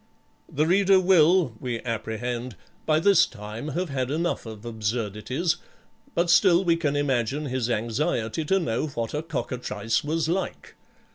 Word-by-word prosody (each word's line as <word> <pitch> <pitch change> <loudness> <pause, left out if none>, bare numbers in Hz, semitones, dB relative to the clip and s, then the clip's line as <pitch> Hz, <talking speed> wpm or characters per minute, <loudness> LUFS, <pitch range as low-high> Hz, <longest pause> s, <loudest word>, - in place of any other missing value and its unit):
The 150 +2 +1
reader 190 +2 +4
will, 175 -5 +4
we 120 -2 -3
apprehend, 120 +1 -4 0.3
by 155 -1 +4
this 200 +3 +5
time 105 +6 -8
have 180 -1 -1
had 130 -2 -2
enough 165 -3 -1
of 110 0 -9
absurdities, 115 - -2 0.6
but 170 0 +2
still 180 0 +5
we 170 -2 +3
can 150 -4 -1
imagine 140 0 0
his 130 -3 -2
anxiety 115 +3 -1
to 190 +5 +2
know 125 -3 -1
what 115 -6 -4
a 150 - -1
cockatrice 120 -7 -2
was 155 +2 -1
like. 185 +3 -3
135 Hz, 145 wpm, -25 LUFS, 115-165 Hz, 0.6 s, this